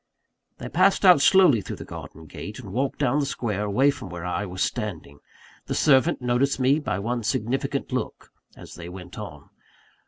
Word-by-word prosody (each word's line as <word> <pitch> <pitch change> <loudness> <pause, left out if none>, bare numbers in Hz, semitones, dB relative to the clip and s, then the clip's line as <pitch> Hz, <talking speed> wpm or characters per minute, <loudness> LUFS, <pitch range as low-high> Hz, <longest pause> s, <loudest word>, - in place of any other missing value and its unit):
They - - -7
passed 195 0 +3
out 180 -6 +7
slowly 175 - +5
through - - -6
the - - -9
garden 80 +1 -10
gate, - - -8
and 95 - -9
walked 135 +3 -1
down 145 0 +1
the 145 - 0
square, 105 -6 -2
away 130 +8 +3
from 130 -2 -9
where 85 0 -7
I 100 +3 -2
was 90 +1 -2
standing. 85 - -4 0.5
The - - -2
servant 130 -3 +3
noticed 125 +3 +1
me 135 +4 +3
by 150 - -2
one 120 +4 -2
significant 120 +3 -2
look, - - -4 0.3
as - - -12
they 85 0 -9
went 90 +1 -10
on. 75 -9 -10
120 Hz, 185 wpm, -24 LUFS, 95-140 Hz, 0.5 s, out